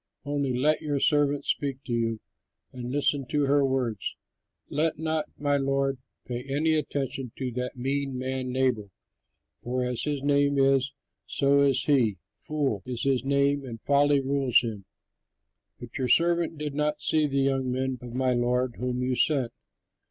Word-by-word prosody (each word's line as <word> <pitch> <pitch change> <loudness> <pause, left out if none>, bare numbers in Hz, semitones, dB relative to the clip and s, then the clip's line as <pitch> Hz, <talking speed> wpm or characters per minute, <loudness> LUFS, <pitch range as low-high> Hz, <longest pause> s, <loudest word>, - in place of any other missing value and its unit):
Only 140 -3 -1
let 150 +4 +2
your 145 -2 -1
servant 145 -1 +2
speak 140 -1 -2
to 120 - -4
you, 115 -1 -1 0.5
and 125 -1 -6
listen 145 +1 +1
to 145 +2 +1
her 140 +1 +3
words. 130 -6 -1 0.6
Let 155 +1 0
not 160 0 -1
my 145 -1 +1
lord 135 -1 0 0.3
pay 120 -1 -4
any 155 +4 +2
attention 135 -5 -2
to 130 -2 -3
that 125 +1 -4
mean 135 +1 -2
man 130 0 -3
Nabal, 125 -5 0 0.7
for 125 +1 -2
as 125 -1 -2
his 145 -2 -2
name 140 0 +3
is, 135 0 +3 0.4
so 140 0 +3
is 135 -2 +3
he. 120 -9 +2 0.2
'Fool' 135 -4 -2
is 125 0 -4
his 135 -3 +1
name 140 +1 +2
and 120 -4 -7
folly 145 0 +4
rules 135 -2 +3
him. 110 -5 -5 0.9
But 120 +1 -10
your 130 - 0
servant 170 +4 +3
did 150 -1 -4
not 150 +1 0
see 155 0 +2
the 140 -1 0
young 135 -2 0
men 130 0 -2
of 120 -1 -8
my 130 -1 +2
lord, 125 0 0
whom 125 0 -1
you 130 0 0
sent. 130 -2 +1
135 Hz, 165 wpm, -27 LUFS, 125-145 Hz, 0.9 s, folly